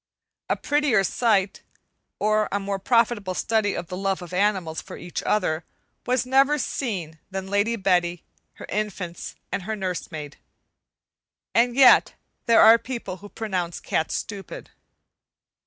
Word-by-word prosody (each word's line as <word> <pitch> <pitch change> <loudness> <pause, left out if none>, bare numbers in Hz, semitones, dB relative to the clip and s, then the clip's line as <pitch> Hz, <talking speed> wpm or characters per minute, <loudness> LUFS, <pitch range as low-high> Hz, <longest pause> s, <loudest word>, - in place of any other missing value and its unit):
A - - +2
prettier 290 -9 +2
sight, 200 -2 +1 0.6
or 215 0 +1
a 200 - 0
more 195 0 -3
profitable 230 -4 +1
study 220 -1 0
of 175 - -4
the 180 - -7
love 195 -1 -2
of 175 0 -10
animals 185 -5 0
for - - -10
each 175 +1 -5
other 175 -6 0 0.4
was 250 0 +1
never 270 +3 +4
seen 185 - -3
than 190 -1 -4
Lady 205 +3 +2
Betty, 175 -4 +1 0.3
her - - -10
infants, 195 -4 -4 0.2
and - - -2
her 215 +4 -4
nurse 185 -3 -4
maid. 150 -2 -7 1.2
And 240 +1 +3
yet, 270 -1 +6 0.3
there 230 -1 +6
are 225 +1 +8
people 235 -8 -6
who 205 +2 -12
pronounce 185 -7 -3
cats 160 - -1
stupid. 200 -2 -7
200 Hz, 140 wpm, -24 LUFS, 180-230 Hz, 1.2 s, are